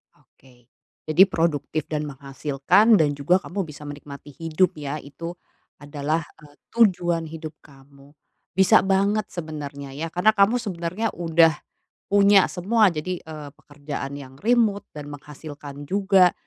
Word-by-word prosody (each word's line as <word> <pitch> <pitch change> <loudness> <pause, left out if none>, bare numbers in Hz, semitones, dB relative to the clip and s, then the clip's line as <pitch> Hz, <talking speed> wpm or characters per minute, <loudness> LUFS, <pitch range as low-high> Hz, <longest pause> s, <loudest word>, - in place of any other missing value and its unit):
Oke, 125 -2 -25 0.4
jadi 155 +4 +6
produktif 160 -3 -1
dan 150 -1 -2
menghasilkan 140 - +2
dan 155 -6 +3
juga 175 +6 +3
kamu 190 -1 -4
bisa 150 -1 -11
menikmati 145 0 -9
hidup 165 +5 0
ya, 145 0 -4
itu 165 +5 -8 0.4
adalah, 145 +2 -2 0.2
eee, 145 -1 -17 0.2
tujuan 175 -7 +2
hidup 160 0 -8
kamu. 140 0 -19 0.4
Bisa 190 -1 +6
banget 195 +2 +1
sebenarnya 145 -4 -7
ya, 160 +4 -4
karena 180 +6 +3
kamu 210 +3 +4
sebenarnya 195 -1 -3
udah 165 -1 +4 0.6
punya 200 -1 +6
semua 210 +4 +3
jadi, 170 +3 -4
eee, 155 -2 -9
pekerjaan 145 -1 -7
yang 130 -2 -11
remote 220 -3 +2
dan 150 -1 -8
menghasilkan 145 0 -10
juga. 190 -2 +4
160 Hz, 130 wpm, -23 LUFS, 145-190 Hz, 0.6 s, jadi